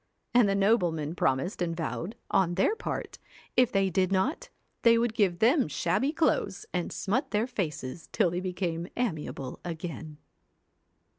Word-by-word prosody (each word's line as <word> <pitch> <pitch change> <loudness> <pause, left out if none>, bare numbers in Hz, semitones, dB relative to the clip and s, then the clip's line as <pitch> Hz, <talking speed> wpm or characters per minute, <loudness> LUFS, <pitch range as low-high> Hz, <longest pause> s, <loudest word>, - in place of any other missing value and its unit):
And 240 -4 +5
the 195 - +2
noblemen 175 -7 +2
promised 135 +4 0
and 165 -2 -1
vowed, 170 +5 -3 0.2
on 175 -2 +2
their 195 - +2
part, - - -5 0.4
if 250 -1 +4
they 195 -1 +2
did 185 +1 +1
not, 275 - 0 0.3
they 230 0 +6
would 230 -1 +1
give 195 -6 +2
them 250 - +4
shabby 185 - 0
clothes, 310 - 0
and 180 -1 -1
smut 255 +8 -1
their 215 +1 +1
faces 165 - -4
till 170 - +2
they 175 - -1
became 180 -2 -3
amiable 155 - -3
again. 160 -2 -6
190 Hz, 150 wpm, -29 LUFS, 165-230 Hz, 0.4 s, they